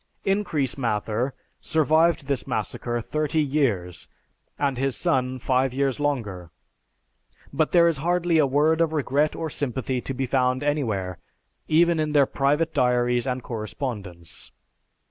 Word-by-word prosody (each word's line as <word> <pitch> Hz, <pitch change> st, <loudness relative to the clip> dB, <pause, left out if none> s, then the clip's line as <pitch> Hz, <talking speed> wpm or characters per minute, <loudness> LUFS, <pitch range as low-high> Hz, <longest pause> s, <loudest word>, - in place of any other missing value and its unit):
Increase 170 Hz, -, 0 dB
Mather 115 Hz, +2 st, -1 dB, 0.2 s
survived 160 Hz, 0 st, +2 dB
this 140 Hz, -3 st, -2 dB
massacre 120 Hz, 0 st, -2 dB
thirty 155 Hz, +5 st, -1 dB
years, 130 Hz, -, 0 dB, 0.5 s
and 135 Hz, -3 st, 0 dB
his 135 Hz, -1 st, 0 dB
son, 130 Hz, -7 st, 0 dB
five 130 Hz, +1 st, 0 dB
years 135 Hz, 0 st, 0 dB
longer, 110 Hz, -, -2 dB, 1.0 s
but 155 Hz, +2 st, +1 dB
there 170 Hz, -1 st, +6 dB
is 165 Hz, -3 st, +1 dB
hardly 175 Hz, +2 st, +1 dB
a 145 Hz, -, +4 dB
word 155 Hz, +4 st, +2 dB
of 160 Hz, -1 st, +1 dB
regret 150 Hz, 0 st, +1 dB
or 165 Hz, -, -3 dB
sympathy 130 Hz, -2 st, -2 dB
to 135 Hz, -, -4 dB
be 135 Hz, +1 st, -1 dB
found 130 Hz, +1 st, +1 dB
anywhere, 110 Hz, -, -1 dB, 0.5 s
even 170 Hz, +1 st, +3 dB
in 155 Hz, -1 st, -1 dB
their 145 Hz, -2 st, +5 dB
private 145 Hz, +5 st, 0 dB
diaries 125 Hz, 0 st, +2 dB
and 125 Hz, -1 st, -2 dB
correspondence. 105 Hz, -, -6 dB
135 Hz, 135 wpm, -24 LUFS, 125-155 Hz, 1.0 s, there